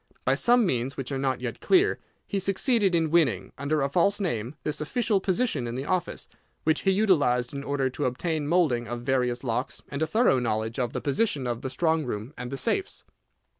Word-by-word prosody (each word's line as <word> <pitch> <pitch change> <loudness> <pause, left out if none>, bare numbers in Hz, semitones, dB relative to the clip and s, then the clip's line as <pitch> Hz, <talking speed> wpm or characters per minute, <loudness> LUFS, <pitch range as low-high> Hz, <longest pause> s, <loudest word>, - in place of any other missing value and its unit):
By - - +3
some 240 -1 +4
means, 130 -4 -1
which 135 0 -4
are 135 - -2
not 130 -2 -1
yet 125 -2 -4
clear, 385 +2 +3 0.3
he 200 - -2
succeeded 195 0 +2
in 160 -2 +1
winning, 135 - +2
under 145 +1 0
a - - +2
false 200 +7 +2
name, 125 - -2
this 150 - -2
official 215 +5 0
position 185 - 0
in 120 - -4
the 135 +2 -4
office, 180 0 -2 0.4
which 160 0 +2
he 195 - +1
utilised 145 - +2
in 140 0 -5
order 140 -2 0
to 145 - -3
obtain 150 +4 -1
moulding 150 -9 +2
of 120 +1 -4
various 125 -1 0
locks, 125 +1 -3
and 140 +1 -5
a 160 - +2
thorough 215 - +3
knowledge 110 0 -2
of 120 -1 -1
the - - -3
position 145 - 0
of 120 -1 -2
the 130 - -4
strong 160 +3 +1
room 120 +1 -5
and 125 +1 -6
the 135 - -3
safes. 380 - -1
140 Hz, 205 wpm, -26 LUFS, 125-180 Hz, 0.4 s, some